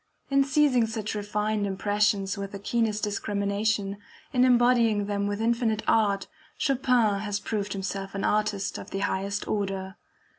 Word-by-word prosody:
In 275 0 +5
seizing 270 -4 +3
such 220 -2 -4
refined 210 0 -1
impressions 205 0 +1
with 200 -1 -6
the - - -4
keenest 215 +1 -1
discrimination, 200 0 -1 0.4
in 250 -1 +4
embodying 240 -4 +4
them 200 0 -1
with 205 0 -2
infinite 230 -1 +1
art, 200 -3 +2 0.3
Chopin 245 -6 +2
has 205 0 -2
proved 205 -2 -3
himself 195 0 -4
an 195 - -2
artist 210 -2 0
of - - -9
the 195 - -3
highest 200 +1 -2
order. 195 -1 -3
210 Hz, 145 wpm, -27 LUFS, 200-225 Hz, 0.4 s, In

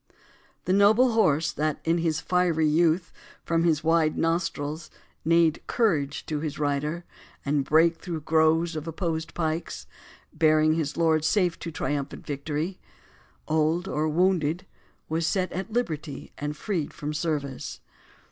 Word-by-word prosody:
The 185 - +1
noble 215 +6 +5
horse, 160 -8 +2
That, 150 0 -1
in 165 +1 +2
his 160 -1 0
fiery 175 -3 +2
youth, 165 +3 +2 0.3
from 165 0 +1
his 155 -2 +2
wide 165 -1 +2
nostrils 160 -2 -1 0.3
Neighed 165 0 +3
courage 155 - 0
to 155 -2 -2
his 155 -1 -4
rider, 150 +3 -1 0.4
and 140 0 +1
brake 165 +4 +3
through 170 -4 -5
Groves 160 +2 +2
of 155 +1 -5
opposed 165 -1 -3
pikes, 160 0 -3 0.5
bearing 155 -1 +4
his 155 -3 -2
lord 160 -2 +3
Safe 175 0 +1
to 170 - -5
triumphant 145 -2 -3
victory, 150 +5 -3 0.7
old 160 +4 +1
or 155 +1 0
wounded, 175 0 +1 0.4
Was 160 +1 -1
set 185 -2 0
at 190 +5 -5
liberty 160 - -3
and 150 +1 -4
freed 175 -7 -3
from 150 +1 -4
service. 140 - -3
160 Hz, 140 wpm, -26 LUFS, 150-170 Hz, 0.7 s, noble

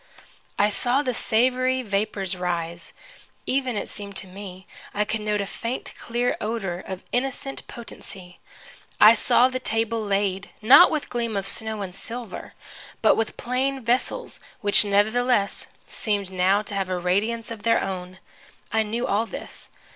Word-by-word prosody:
I 205 +1 +3
saw 250 +6 +1
the 255 -3 -1
savory 255 +3 +2
vapors 200 -3 -1
rise. 170 -1 -3 0.5
Even, 260 -4 0
it - - -3
seemed 200 -1 -6
to 190 - -1
me, 185 -1 -9 0.3
I 210 +1 +2
could 215 +1 -2
note 210 -1 0
a - - -2
faint, 230 +5 -4
clear 240 +1 -1
odor 205 -5 -2
of 190 0 -6
innocent 270 +2 -2
potency. 190 -6 -9 0.6
I 215 +2 +10
saw 245 +1 +4
the 255 0 -3
table 225 -2 0
laid, 195 -1 0
not 265 +11 +8
with 305 -2 -2
gleam 235 -3 -1
of 195 0 -2
snow 220 0 -1
and 185 -1 -7
silver, 230 +4 -5 0.5
but - - +7
with 225 -1 -2
plain 265 +3 -1
vessels 250 - -1 0.2
which, 205 0 +5
nevertheless, 210 +1 +2 0.2
seemed 205 -4 -2
now 190 +3 +3
to 205 - -7
have 195 -2 -1
a 185 - 0
radiance 210 +6 0
of 225 -2 -6
their 230 +1 +3
own. 185 -1 -5 0.6
I 220 - +4
knew 225 +3 -2
all 215 +3 +1
this. - - -8
215 Hz, 155 wpm, -24 LUFS, 195-240 Hz, 0.6 s, I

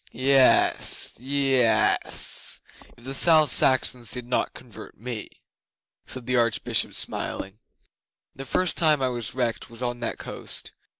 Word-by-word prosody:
'Yes 130 +2 +3
yess; 135 -2 +1 0.4
if 120 - -19
the 135 +2 -6
South 155 -2 +4
Saxons 125 -3 +2
did 125 -1 -2
not 125 - -2
convert - - -13
me,' 115 -1 -7 0.8
said 130 -2 -8
the 125 +1 0
Archbishop, 115 -2 +1
smiling. 95 +3 -3 0.8
'The 135 - -8
first 180 +6 -1
time 155 -4 +2
I 130 - +1
was 120 -2 -4
wrecked 120 -3 -3
was 115 +2 -8
on 120 -1 -3
that 120 - -4
coast. - - -3
125 Hz, 130 wpm, -24 LUFS, 120-135 Hz, 0.8 s, South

